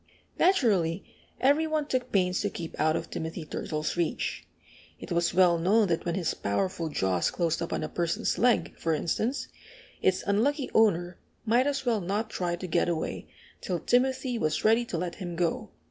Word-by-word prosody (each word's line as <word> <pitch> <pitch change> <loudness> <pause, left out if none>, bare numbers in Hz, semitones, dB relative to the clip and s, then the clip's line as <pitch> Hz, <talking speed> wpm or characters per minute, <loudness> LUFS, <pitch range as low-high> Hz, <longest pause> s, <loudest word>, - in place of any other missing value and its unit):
Naturally 205 - +3 0.4
every 290 +4 +3
one 310 -1 0
took 255 -3 -2
pains 180 -2 +2
to 205 - 0
keep 170 -4 -7
out 155 +1 +3
of - - -4
Timothy 160 0 -5
Turtle's 155 0 -3
reach. 170 -2 -2 0.5
It - - -9
was 170 0 +2
well 175 -2 +4
known 200 +4 +3
that 165 -1 0
when 170 -1 -1
his 175 -4 0
powerful 165 - -2
jaws 95 - +1
closed 170 -2 -1
upon 170 - -2
a - - -2
person's 170 +1 -1
leg, 245 +3 +2
for 165 -1 +1
instance, 220 - -1 0.5
its 185 -1 +2
unlucky 255 +8 +1
owner 180 -5 +2 0.3
might 240 +4 +3
as 275 -1 -1
well 230 -4 +1
not 205 +5 -2
try 175 -1 -1
to 180 - -7
get 175 0 +1
away 165 -2 -3 0.3
till 180 - -2
Timothy 255 +1 +1
was 155 +1 -1
ready 225 +2 +4
to 190 - -4
let 175 0 -3
him 175 -2 -4
go. 170 -1 -1
180 Hz, 175 wpm, -28 LUFS, 170-235 Hz, 0.5 s, well